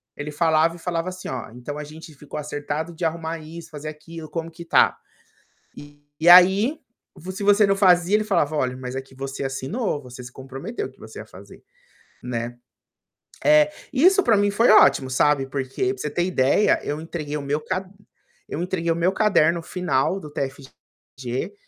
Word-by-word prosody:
ele 150 Hz, +1 st, -6 dB
falava 160 Hz, +1 st, +2 dB
e -, -, -13 dB
falava 170 Hz, 0 st, -3 dB
assim: 185 Hz, 0 st, -8 dB
"Olha, 125 Hz, -3 st, -6 dB
então, 145 Hz, +4 st, -7 dB
a 150 Hz, -, -5 dB
gente 155 Hz, +1 st, -12 dB
ficou 145 Hz, +2 st, -9 dB
acertado 150 Hz, +3 st, -4 dB
de 165 Hz, +1 st, -4 dB
arrumar 165 Hz, 0 st, -3 dB
isso, 160 Hz, +2 st, -10 dB
fazer 150 Hz, 0 st, -8 dB
aquilo, 155 Hz, +1 st, -10 dB
como 165 Hz, -1 st, -5 dB
que 170 Hz, +1 st, -10 dB
está?" 165 Hz, -, +3 dB, 1.2 s
E 165 Hz, -, -1 dB
aí, 190 Hz, -, +7 dB, 0.4 s
vo 180 Hz, +1 st, -8 dB
se 200 Hz, +2 st, -6 dB
você 205 Hz, 0 st, +5 dB
não 195 Hz, -, +2 dB
fazia, 185 Hz, -1 st, +4 dB
ele 215 Hz, -, +2 dB
falava: 170 Hz, -8 st, 0 dB
"Olha, 130 Hz, -3 st, -1 dB
mas 130 Hz, 0 st, -6 dB
aqui 135 Hz, 0 st, -7 dB
você 135 Hz, +1 st, -5 dB
assinou, 145 Hz, -, -3 dB
você 125 Hz, -1 st, -11 dB
se 125 Hz, -, -10 dB
comprometeu 135 Hz, -, -6 dB
que -, -, -27 dB
você -, -, -11 dB
ia -, -, -8 dB
fazer.", -, -, -15 dB, 0.6 s
né, 120 Hz, 0 st, -4 dB, 0.9 s
eh, 300 Hz, 0 st, +5 dB, 0.2 s
isso 370 Hz, +9 st, +5 dB
para 225 Hz, -, +3 dB
mim 205 Hz, 0 st, +2 dB
foi 225 Hz, +4 st, +3 dB
ótimo, 130 Hz, -10 st, +5 dB
sabe, 140 Hz, +1 st, +2 dB
porque 135 Hz, -, -2 dB
para -, -, -16 dB
você -, -, -3 dB
ter 175 Hz, -, 0 dB
ideia, 180 Hz, +2 st, +2 dB
eu 145 Hz, +1 st, -3 dB
entreguei 155 Hz, -2 st, -5 dB
o -, -, -6 dB
meu 145 Hz, +2 st, -1 dB
cad 185 Hz, +4 st, -3 dB, 0.6 s
eu 165 Hz, -, -4 dB
entreguei 175 Hz, -2 st, -2 dB
o -, -, -3 dB
meu 170 Hz, +3 st, +1 dB
caderno 170 Hz, -5 st, +2 dB
final 180 Hz, -1 st, -1 dB
do 150 Hz, -, -10 dB
TFG, 135 Hz, +2 st, -7 dB
160 Hz, 185 wpm, -23 LUFS, 140-185 Hz, 1.2 s, aí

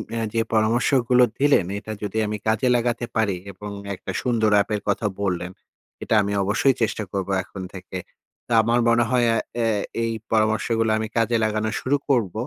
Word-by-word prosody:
এ -, -, -2 dB, 0.2 s
যে, 115 Hz, -, +2 dB
পরামর্শগুলো 120 Hz, +3 st, +3 dB, 0.2 s
দিলেন, 140 Hz, -9 st, +4 dB
এটা 110 Hz, -, -8 dB
যদি 105 Hz, +1 st, -3 dB
আমি 105 Hz, 0 st, -3 dB
কাজে 110 Hz, +3 st, +2 dB
লাগাতে 120 Hz, 0 st, 0 dB
পারি 105 Hz, -5 st, +1 dB
এবং 105 Hz, +2 st, -8 dB, 0.2 s
একটা -, -, -7 dB
সুন্দর 115 Hz, -4 st, +1 dB
app -, -, -4 dB
এর 105 Hz, -, -4 dB
কথা 105 Hz, +2 st, 0 dB, 0.2 s
বললেন, 90 Hz, -2 st, -2 dB, 0.5 s
এটা -, -, +1 dB
আমি 100 Hz, 0 st, -2 dB
অবশ্যই 110 Hz, +7 st, +2 dB
চেষ্টা 110 Hz, -1 st, 0 dB
করব 95 Hz, -1 st, -3 dB
এখন 95 Hz, -, -9 dB
থেকে। 95 Hz, 0 st, -7 dB, 0.5 s
তো -, -, -12 dB
আমার 115 Hz, +2 st, +2 dB
মনে 120 Hz, 0 st, +4 dB
হয় 125 Hz, -1 st, +3 dB
এ -, -, +1 dB, 0.3 s
আ -, -, +2 dB, 0.4 s
এই 115 Hz, -, 0 dB, 0.2 s
পরামর্শগুলো 110 Hz, +1 st, +1 dB
আমি 110 Hz, 0 st, -2 dB
কাজে 115 Hz, +1 st, +2 dB
লাগানো 110 Hz, 0 st, 0 dB
শুরু 140 Hz, +3 st, +1 dB
করব 115 Hz, -10 st, +2 dB
110 Hz, 180 wpm, -23 LUFS, 105-120 Hz, 0.5 s, দিলেন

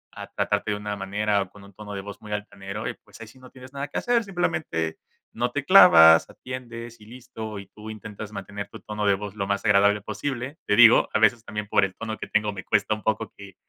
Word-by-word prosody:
a -, -, -8 dB
tratarte 110 Hz, -, -1 dB
de 105 Hz, -, -1 dB
una 105 Hz, 0 st, -4 dB
manera 100 Hz, +1 st, 0 dB
o 95 Hz, -, -5 dB
con 100 Hz, +1 st, -16 dB
un 100 Hz, 0 st, -16 dB
tono 105 Hz, +1 st, -9 dB
de 100 Hz, -, -4 dB
voz 100 Hz, 0 st, -10 dB
muy 105 Hz, -, -11 dB
altanero, 105 Hz, 0 st, -6 dB
y, -, -, -4 dB
pues, -, -, -17 dB
ahí -, -, -7 dB
sí 120 Hz, +4 st, -17 dB
no 130 Hz, 0 st, -14 dB
tienes 130 Hz, +1 st, -14 dB
nada 140 Hz, +1 st, -4 dB
que 145 Hz, -, -6 dB
hacer, 240 Hz, -1 st, +1 dB
simplemente 160 Hz, -, -2 dB, 0.4 s
no 120 Hz, +2 st, -1 dB
te 145 Hz, +1 st, -3 dB
clavas, 80 Hz, -, +8 dB
atiendes 120 Hz, -2 st, -9 dB
y -, -, -14 dB
listo, 115 Hz, -3 st, -8 dB
y 100 Hz, -, -10 dB
tú 110 Hz, +1 st, -12 dB
intentas 110 Hz, -1 st, -8 dB
mantener 100 Hz, 0 st, -7 dB
tu -, -, -11 dB
tono 105 Hz, -1 st, -3 dB
de 100 Hz, -, +4 dB
voz 100 Hz, 0 st, -7 dB
lo 100 Hz, -2 st, -3 dB
más 100 Hz, +1 st, -2 dB
agradable 105 Hz, 0 st, +4 dB
posible. 130 Hz, +7 st, -5 dB
Te 105 Hz, -, +3 dB
digo, 120 Hz, 0 st, +7 dB
a -, -, +3 dB
veces 110 Hz, +1 st, +3 dB
también 105 Hz, -2 st, -5 dB
por 100 Hz, -, +3 dB
el 95 Hz, -, -8 dB
tono 110 Hz, -1 st, -5 dB
que -, -, -6 dB
tengo, 105 Hz, -1 st, 0 dB
me 95 Hz, -2 st, -7 dB
cuesta -, -, +1 dB
un 105 Hz, -, -11 dB
poco 110 Hz, -1 st, -1 dB
que 100 Hz, -2 st, -13 dB
105 Hz, 245 wpm, -25 LUFS, 100-120 Hz, 0.4 s, clavas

